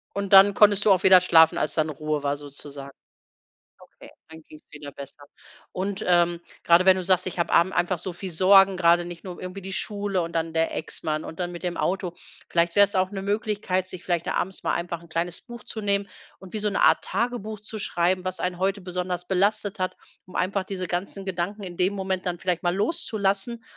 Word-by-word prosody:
Und 200 0 -2
dann 195 +1 +8
konntest 205 -1 +4
du 210 - +6
auch 185 - +3
wieder 185 -1 +8
schlafen, 160 -3 +5
als 150 - -1
dann 155 -1 +1
Ruhe 155 0 -3
war 140 0 0
sozusagen? 140 -1 -9 0.9
Okay, - - -16 0.2
dann 160 0 -12
ging 155 - -14
es - - -24
wieder 145 -1 -9
besser. 140 +1 -11 0.5
Und, 195 +2 -3
ähm, 175 -1 +3 0.2
gerade 170 +2 +5
wenn 190 0 +6
du 185 - -3
sagst, 185 0 +2
ich 185 - -5
habe 170 - 0
abend 170 +3 +4
einfach 175 0 0
so 180 +1 -5
viel 185 +2 -6
Sorgen, 195 +2 +5
gerade 175 -1 +4
nicht 175 -1 -9
nur 180 -2 -8
irgendwie 185 +2 -7
die 190 +1 -7
Schule 200 -2 -1
und 170 0 -5
dann 165 0 -2
der 165 0 0
Ex-Mann 155 -1 -4
und 160 - -9
dann 175 -1 -2
mit 175 - -8
dem 175 -1 -3
Auto. 185 -2 -1 0.4
Vielleicht 170 0 +1
wäre 205 - +7
es 200 - -8
auch 185 0 +1
'ne 195 -2 -5
Möglichkeit, 205 -3 -1
sich 185 -1 -9
vielleicht 175 -2 -1
da - - -1
abends 190 +1 -3
mal - - 0
einfach 170 -1 -3
'n 170 - -17
kleines 170 +2 -3
Buch 240 -3 -11
zu 220 - -7
nehmen 200 -1 0 0.3
und 190 -2 -13
wie 215 - -2
so 210 0 0
'ne 200 - -1
Art - - +4
Tagebuch 225 -3 -3
zu 210 +2 -8
schreiben, 180 -1 0
was 185 0 -3
einen 180 -1 -2
heute 195 +1 0
besonders 180 -1 -4
belastet 200 +2 0
hat, 185 0 -2 0.3
um 185 - -15
einfach 195 +2 0
diese 185 -1 -4
ganzen 190 +3 -4
Gedanken 190 +3 -3
in 175 -2 -8
dem 185 +2 +1
Moment 190 -2 -3
dann 175 -1 -3
vielleicht 180 0 -2
mal 175 0 +1
loszulassen, 210 - -1
185 Hz, 225 wpm, -25 LUFS, 170-195 Hz, 0.9 s, dann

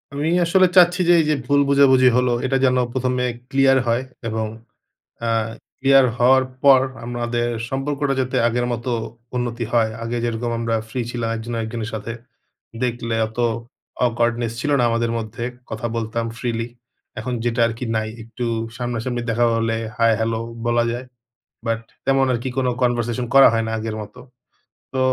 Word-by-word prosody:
আমি 145 +2 -1 0.2
আসলে 185 +2 +5
চাচ্ছি 175 +1 +6
যে - - +8
এই 160 - +2
যে - - +4
ভুল 145 0 +3
বুঝাবুঝি 135 -2 +6
হলো, 125 -1 +2
এটা 135 +1 +2
যেন 130 -1 +3 0.2
প্রথমে 125 -1 0 0.3
ক্লিয়ার 135 -1 +4
হয়। 115 +2 +1 0.2
এবং 110 -1 -2 0.7
অ্যা 115 0 -1 0.5
ক্লিয়ার 135 -1 +5
হওয়ার 130 +2 +5 0.2
পর 135 -2 +7 0.2
আমরাদের 120 0 -2 0.2
সম্পর্কটা 140 +1 -1
যাতে 130 0 -1
আগের 120 +1 0
মত 115 -1 -4 0.5
উন্নতি 120 -1 -2
হয়। 115 -2 +3
আগে 115 +1 -3
যেরকম 120 0 -2
আমরা 115 -1 -1
ফ্রি 125 +3 -3
ছিলাম, 120 -2 -2
একজন 115 +2 -6
আর 115 - -1
একজনের 110 0 -4
সাথে। 110 +1 -4 0.7
দেখলে 120 -2 -1
অত 110 +2 -13 0.7
awkwardness 120 -1 0
ছিল 145 - -1
না 120 - +3
আমাদের 115 0 0
মধ্যে। 115 +1 -5 0.3
কথা 115 +2 -3
বলতাম 115 0 -2
freely 115 -2 -2 0.5
এখন 125 +3 -4
যেটা 120 0 0
আরকি 115 +2 -4
নাই। 110 0 -1
একটু 115 +2 -6 0.3
সামনা-সামনি 120 0 -3
দেখা 120 +1 +2
হলে 115 0 0 0.2
হাই-হ্যালো 115 0 +2 0.3
বলা 120 0 +2
যায়। 125 +2 -5 0.6
বাট, 115 0 0 0.3
তেমন 135 0 +3
আর 120 - +1
কি 130 - -2
কোন 130 -1 +1 0.2
conversation 120 0 0
করা 135 - +9
হয় 115 0 +1
না - - -3
আগের 110 0 -4
মতো। 105 - -10 0.7
তো 130 - -1
120 Hz, 160 wpm, -21 LUFS, 115-130 Hz, 0.7 s, করা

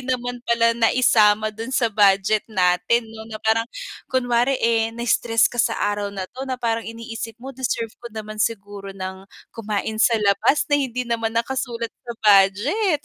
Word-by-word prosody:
naman 245 -1 -3
pala 230 -1 +2
naisama 220 -2 +3
dun 225 +3 -7
sa 250 -4 0
budget 200 +1 +3
natin, 180 +3 +2
'no, 220 0 -10
na 220 - -6
parang 225 +1 +2 0.4
kunware, 245 0 +1
eh, 225 -2 +1
na-stress 230 0 +1
ka 240 - +1
sa 225 - +1
araw 205 0 -1
na, 195 -2 -5
'to, 260 +7 -8
na 260 - -2
parang 230 -2 -1
iniisip 230 0 -7
mo, 265 +3 -9
deserve 235 -3 -3
ko 235 - -8
naman 215 -1 -7
siguro 205 -3 -3
ng 190 +1 -7 0.2
kumain 215 0 -3
sa 230 -1 +4
labas 210 +7 +2
na 290 - +4
hindi 250 -2 -2
naman 230 -1 -2
nakasulat 235 -1 -2
sa 240 - -9
budget. 220 - +3
230 Hz, 165 wpm, -22 LUFS, 210-240 Hz, 0.4 s, sa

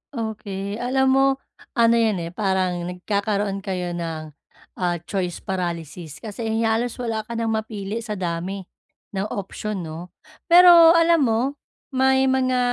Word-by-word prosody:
Okey, 205 -2 -4
alam 265 +2 +2
mo, 270 0 +4 0.5
ano 230 -1 +4
'yan 220 -3 +2
eh, 165 - -6
parang 190 -2 0
nagkakaroon 200 +2 -1
kayo 180 -2 -3
ng, 165 -3 -5 0.5
ah, 175 -2 +1
choice 180 -2 -3
paralysis, 170 -4 -5
kasi, 225 +1 -5
eh, 220 +1 0
halos 225 +2 0
wala 225 -3 -3
ka 235 - -5
nang 230 -1 -1
mapili 220 -1 -3
sa 215 -2 -5
dami 185 +2 -3 0.5
ng 195 +1 -2
option, 200 -1 -5
'no? 160 +2 -7 0.4
Pero 345 -1 +8
alam 335 0 +5
mo, 225 0 +2 0.5
may 265 0 +3
mga 260 -1 +2
210 Hz, 140 wpm, -23 LUFS, 185-235 Hz, 0.5 s, Pero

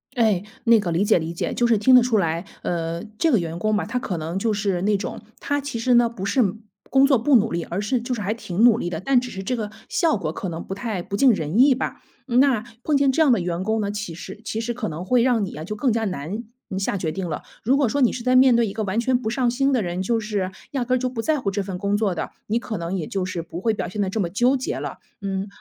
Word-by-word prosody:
哎， 215 -6 +2 0.2
那 230 -1 +6
个 180 -4 -2
理 170 +4 +2
解 205 - +4
理 165 +1 -4
解， - - -2
就 240 - +1
是 230 -2 +4
听 255 +5 +5
得 250 - +8
出 235 -3 +2
来， 170 0 -1 0.2
呃， 170 -1 -2
这 325 - +2
个 225 - +4
员 165 0 -4
工 215 +4 +1
吧， 210 - 0
他 230 +4 -3
可 190 -8 -3
能 165 +4 -4
就 220 +2 0
是 200 -4 -1
那 205 0 +3
种 195 - -5 0.2
他 285 0 -1
其 275 -5 -4
实 245 +1 +3
呢， 240 -1 +5
不 200 -5 -6
是 255 +6 +2 0.5
工 270 0 +6
作 270 -3 +4
不 255 +4 +3
努 225 0 +4
力， 170 0 -1
而 190 +4 -3
是 235 +4 0
就 245 +2 -3
是 220 - -3
还 205 +3 -1
挺 210 -2 -2
努 235 -2 +7
力 175 - -2
的， 160 - -3
但 255 +6 +3
只 250 0 -6
是 190 0 -6
这 250 +6 -1
个 215 -2 -4 0.2
效 330 -6 +2
果 160 -6 -2
可 185 +2 -5
能 165 0 -5
不 195 - -6
太 205 -3 -3
不 200 +3 -4
尽 265 0 +6
人 165 +2 -1
意 270 +1 +7
吧。 255 - -4 0.3
嗯， 245 0 +3
那 260 -6 +3 0.2
碰 300 - +1
见 275 -1 +4
这 320 - +1
样 275 - +4
的 230 - +4
员 175 +1 -2
工 220 +1 0
呢， 200 - -1
其 205 -5 -5
实 190 +5 -9
其 225 - -2
实 240 +1 -2
可 230 -2 -4
能 160 +3 -5
会 240 +5 +3
让 240 -5 +2
你 180 - -8
啊， 155 - -6
就 210 +5 -5
更 250 +4 +1
加 225 0 0
难， 185 +5 -4 0.3
呃， 190 - -4
下 195 - -1
决 165 -4 -2
定 190 0 -4
了。 155 - -4 0.2
如 255 +5 +3
果 275 -5 +2
说 285 - -1
你 250 - +4
是 235 - -5
在 255 0 +3
面 255 -2 +6
对 235 -2 +3
一 195 - -5
个 220 -1 -2
完 200 +3 -1
全 250 +1 +2
不 220 -3 -3
上 250 -1 +1
心 270 +3 +1
的 245 - +2
人， 175 0 -3
就 230 +4 +1
是 205 -4 -2 0.2
压 260 -4 -1
根 255 +1 +2
儿 - - 0
就 255 0 -1
不 230 -3 -4
在 310 -2 +1
乎 200 - -1
这 200 0 -2
份 185 -2 -5
工 200 0 +1
作 205 -4 +1
的， 160 - -4 0.2
你 225 +3 +1
可 225 -3 -5
能 170 +3 -3
也 160 -5 -3
就 190 -2 -2
是 185 -2 -3
不 170 +1 -7
会 225 0 +2
表 180 -4 -3
现 210 - -6
得 190 - 0
这 220 - -2
么 175 -4 0
纠 245 +8 +2
结 260 - -3
了。 - - -6 0.2
嗯， 195 0 -3
215 Hz, 325 characters per minute, -23 LUFS, 185-245 Hz, 0.5 s, 得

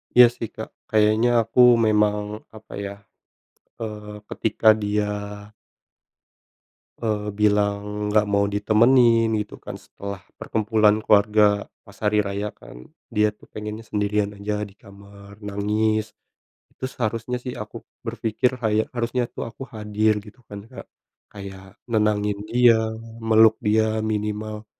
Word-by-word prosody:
Iya 125 - +10
sih, 115 - -4
Kak, 110 - -6 0.2
kayaknya 110 +2 +3
aku 115 +2 -3 0.3
memang 105 -1 +3 0.4
apa 110 - -14
ya, 100 - -5 0.9
eee, 105 -2 -6 0.2
ketika 110 0 +1
dia 105 +1 0 2.0
eee, 105 -2 -2
bilang 105 0 0
nggak 105 0 +3
mau 100 0 +2
ditemenin 115 +2 +4
gitu 105 - -5
kan - - -8
setelah 100 -1 -8 0.2
perkumpulan 110 -1 +2
keluarga 105 -1 +3 0.2
pas 100 -2 -16
hari 105 0 +3
raya 100 0 -2
kan, 60 +1 -14 0.2
dia 105 0 +1
tuh 105 - -21
pengennya 105 +1 -6
sendirian 105 0 -1
aja 105 +1 -3
di 100 - -18
kamar 100 -1 -15
nangis. 105 +1 -1 0.6
Itu 130 - -5
seharusnya 120 0 -3
sih 125 0 -6
aku - - -8 0.2
berpikir 125 +3 -1
kayak 110 -2 0
harusnya 120 +1 -1
tuh - - -5
aku 115 +3 -9
hadir 105 0 0
gitu 105 +4 -15
kan, 100 0 -8
Kak. 130 - -11 0.5
Kayak 95 -1 -10
nenangin 105 -2 +1
dia, 120 -1 +5 0.4
meluk 110 0 +6
dia 110 +1 +2
minimal, 105 0 -3
105 Hz, 125 wpm, -23 LUFS, 105-110 Hz, 2.0 s, Iya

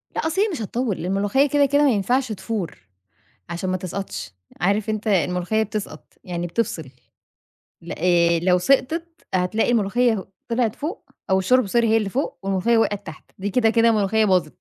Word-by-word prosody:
لا - - -1
أصل 340 +5 0
هي 425 - +3
مش 335 - -4
هتطوّل، 225 0 -2
لأن - - -5
الملوخية 205 +8 +2
كده 285 +1 +4
كده 285 +2 +3
ما 290 - +5
ينفعش 245 +4 0
تفور، 200 -2 -4 0.7
عشان 175 +2 -3
ما 185 - 0
تسقطش، 175 - -6 0.3
عارف 200 +4 +1
أنت 215 0 -3
الملوخية 185 +1 +1
بتسقط 205 -7 -6
يعني 175 -1 -3
بتفصل، 170 - -3 0.9
لأ 170 - -7
آآ، 170 -1 +3
لو 180 +1 +3
سقطت 275 - +1 0.3
هتلاقي 185 +6 +1
الملوخية 225 -1 +1 0.2
طلعت 235 -2 0
فوق، 335 +10 -5 0.3
أو 190 0 +3
الشوربة 250 +4 +3
sorry 235 +4 +2
هي 225 -1 +3
اللي 210 -3 -1
فوق، 270 +9 -2
والملوخية 195 +4 +1
وقعت 205 -2 0
تحت، 155 - -11
دي 200 +2 -3
كده 225 +2 +3
كده 230 0 +4
ملوخية 215 0 +2
باظت. 180 -6 +1
210 Hz, 175 wpm, -22 LUFS, 185-235 Hz, 0.9 s, ما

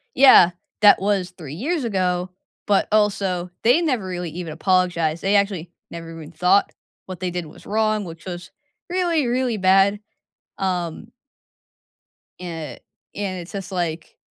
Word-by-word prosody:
"Yeah, 255 -10 +8 0.3
that 205 -2 +7
was 195 -2 0
3 160 -6 -10
years 290 - -2
ago, 185 -4 -1 0.4
but 200 -1 +2
also 195 -4 +1
they 245 +9 +4
never 255 - 0
really 180 -2 -4
even 165 -1 -6
apologized, 170 -2 +1
they 200 +1 +2
actually 195 -4 0 0.2
never 165 -1 -8
even 160 -1 -10
thought 180 +3 +2 0.4
what 185 -1 -7
they 185 - -2
did 175 -1 -4
was 155 - -15
wrong, 215 0 0
which 165 -1 -10
was, 180 -1 -7 0.4
really, 345 -6 +1
really 245 -1 0
bad," 195 +1 +4 0.6
um 180 +3 -3 1.3
eh, 165 -3 -6 0.4
and 195 -3 -3
it's 175 0 -9
just, 195 -3 -6
like, 170 -3 -4
185 Hz, 140 wpm, -22 LUFS, 175-210 Hz, 1.3 s, Yeah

